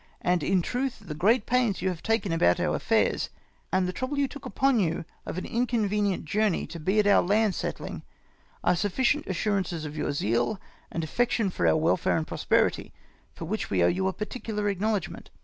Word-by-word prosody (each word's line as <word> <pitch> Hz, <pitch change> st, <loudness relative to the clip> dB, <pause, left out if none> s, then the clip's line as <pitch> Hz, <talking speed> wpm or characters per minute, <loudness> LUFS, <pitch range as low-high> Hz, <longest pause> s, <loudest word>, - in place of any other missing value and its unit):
And, 180 Hz, -1 st, +2 dB
in 180 Hz, +4 st, +2 dB
truth, 250 Hz, -1 st, -3 dB
the 155 Hz, -, -5 dB
great 205 Hz, +9 st, +2 dB
pains 245 Hz, -5 st, +1 dB
you 190 Hz, -, +2 dB
have 180 Hz, -3 st, -5 dB
taken 225 Hz, -4 st, 0 dB
about 90 Hz, -, +3 dB
our -, -, +1 dB
affairs, -, -, +1 dB, 0.4 s
and 185 Hz, -1 st, +2 dB
the 180 Hz, -, -3 dB
trouble 255 Hz, +9 st, -3 dB
you 280 Hz, -1 st, +2 dB
took 280 Hz, -1 st, -9 dB
upon 265 Hz, -1 st, +2 dB
you 165 Hz, -3 st, 0 dB, 0.2 s
of -, -, -4 dB
an 185 Hz, -, -3 dB
inconvenient 210 Hz, -6 st, 0 dB
journey 205 Hz, +3 st, +1 dB
to 170 Hz, -, -6 dB
be 190 Hz, +7 st, 0 dB
at 210 Hz, -, +4 dB
our 205 Hz, -, +6 dB
land 210 Hz, +2 st, +2 dB
settling, -, -, -4 dB, 0.6 s
are -, -, +3 dB
sufficient 240 Hz, -, +1 dB
assurances 185 Hz, -3 st, -1 dB
of 150 Hz, 0 st, -6 dB
yom 150 Hz, -, -1 dB
zeal 120 Hz, -, 0 dB, 0.3 s
and 165 Hz, -, -2 dB
affection 225 Hz, +3 st, 0 dB
for -, -, 0 dB
our -, -, +4 dB
welfare 165 Hz, +2 st, +2 dB
and 160 Hz, -, -1 dB
prosperity, -, -, +1 dB, 0.4 s
for 165 Hz, -, -6 dB
which 215 Hz, +6 st, -3 dB
we 90 Hz, -3 st, +2 dB
owe -, -, +5 dB
you 190 Hz, +2 st, +1 dB
a 190 Hz, -, 0 dB
particular 210 Hz, -1 st, -3 dB
acknowledgment. 200 Hz, 0 st, -2 dB
195 Hz, 195 wpm, -27 LUFS, 170-225 Hz, 0.6 s, our